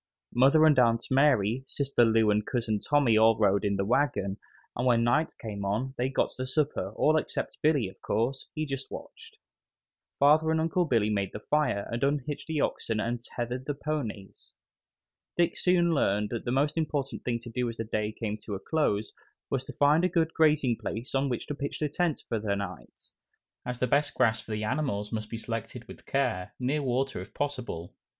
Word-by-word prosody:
Mother 140 +6 +5
and 150 -4 +5
Aunt 115 -1 +3
Mary, 130 -4 +3
Sister 140 -3 +1
Lou 110 -2 +4
and 105 +1 +2
Cousin 110 -2 -1
Tommy 140 -5 +3
all 110 0 +5
rode 100 -1 +3
in 100 -1 +1
the 100 0 -1
wagon, 105 -5 +1 0.4
and 125 +2 0
when 115 -2 +4
night 120 +7 +1
came 105 -3 -5
on 110 +7 -1
they 125 +1 0
got 135 - 0
the 130 - -2
supper, 135 -8 -1
all 155 +1 +3
except - - -3
Billy, 145 -8 +3
of 95 0 -13
course; 130 +4 -1
he 155 0 -1
just 135 -2 -5
watched. - - -10 0.8
Father 155 +3 +5
and 160 0 +2
Uncle 165 +2 +1
Billy 115 -7 +2
made 100 -2 -1
the - - -5
fire 130 -7 0
and 115 +2 -2
unhitched 145 +1 -1
the 160 -2 -1
oxen 115 -5 -1
and 120 +2 -2
tethered 125 +2 -5
the 145 - -1
ponies. 135 -10 -5 0.8
Dick 170 -1 +2
soon 175 -2 +3
learned 105 -7 +1
that 120 - -4
the 120 - -1
most 145 +5 +1
important 145 -3 -2
thing 120 -1 0
to 120 0 -10
do 125 +1 -1
as 115 - -7
the 115 - -2
day 110 -1 -2
came 110 -1 -4
to 105 -1 -6
a - - -5
close 110 -7 0 0.4
was 130 -1 0
to - - -7
find 150 +4 +4
a 185 - +3
good 165 -2 +1
grazing 150 -7 +3
place 115 +4 -5
on 135 +1 +1
which 120 - -3
to - - -4
pitch 140 0 -4
tent 175 -3 0
for 115 - -1
the 105 -1 -1
night, 95 -3 -8 0.6
as 125 -1 -3
the 125 - +1
best 145 +3 +1
grass 110 -3 +2
for - - -18
the 105 0 -2
animals 105 -4 -1
must 110 -2 -4
be 115 - -4
selected 115 +1 -5
with - - -13
care, 115 -10 -1
near 135 +4 0
water 135 -4 -1
if 95 - -10
possible. 125 - -4
125 Hz, 200 wpm, -28 LUFS, 110-145 Hz, 0.8 s, Mother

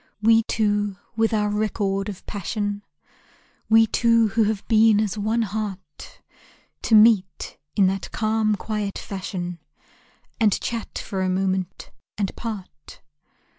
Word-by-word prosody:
We 225 +1 +5
two 205 -3 0 0.2
with 225 0 +2
our 210 -2 +1
record 205 -2 -1
of 195 -2 -9
passion, 205 0 -3 0.9
We 225 0 +6
two 230 0 +3
who 225 +2 +2
have 210 -1 -2
been 220 -2 +5
as 215 -2 -1
one 220 +2 0
heart, 200 -7 -7 0.6
To 225 - +3
meet 210 -4 +3 0.2
in 200 - +4
that 190 0 -1
calm, 215 -1 +1
quiet 210 -1 -4
fashion, 180 -3 -5 0.8
And 215 -3 +3
chat 230 -2 -4
for 190 -2 -4
a 185 - 0
moment 190 0 -2 0.3
and 200 -2 -2
part. 195 - -8
210 Hz, 130 wpm, -23 LUFS, 195-220 Hz, 0.9 s, We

